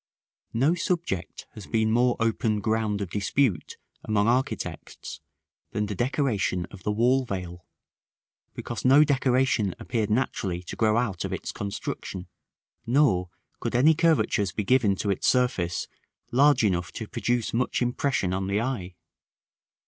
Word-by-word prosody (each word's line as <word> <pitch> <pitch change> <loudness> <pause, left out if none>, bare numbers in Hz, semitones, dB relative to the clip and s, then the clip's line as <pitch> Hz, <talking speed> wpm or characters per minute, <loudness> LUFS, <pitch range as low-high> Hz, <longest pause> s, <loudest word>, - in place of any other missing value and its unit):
§ - - -73
I. - - -14
No 160 - +4
subject 170 - -3
has 105 - -10
been 110 -1 +1
more 120 +1 +3
open 115 -1 +1
ground 110 -1 0
of 95 -4 -4
dispute 105 - 0 0.3
among 105 -1 +1
architects 120 - -3 0.5
than 105 - 0
the 105 - -4
decoration 120 - 0
of 100 - -11
the 105 - -1
wall 125 +5 +3
veil, 90 -6 -6 0.9
because 120 - -5
no 135 +4 +7
decoration 130 - +1
appeared 110 -4 -2
naturally 100 -6 -1
to - - -7
grow 110 0 +2
out 110 -7 -1
of - - -4
its - - -4
construction; 100 -2 -5 0.6
nor 115 -9 +3 0.3
could - - -3
any 145 +6 +6
curvatures 155 - +2
be 105 - -3
given 110 -3 +3
to 100 +1 -1
its 95 - -1
surface 110 -9 +1 0.4
large 140 0 +4
enough 90 -4 0
to 110 - -6
produce 120 +1 -1
much 125 +2 0
impression 120 -6 0
on 95 0 -2
the 100 +1 0
eye. 110 -7 -3
110 Hz, 150 wpm, -26 LUFS, 100-130 Hz, 0.9 s, no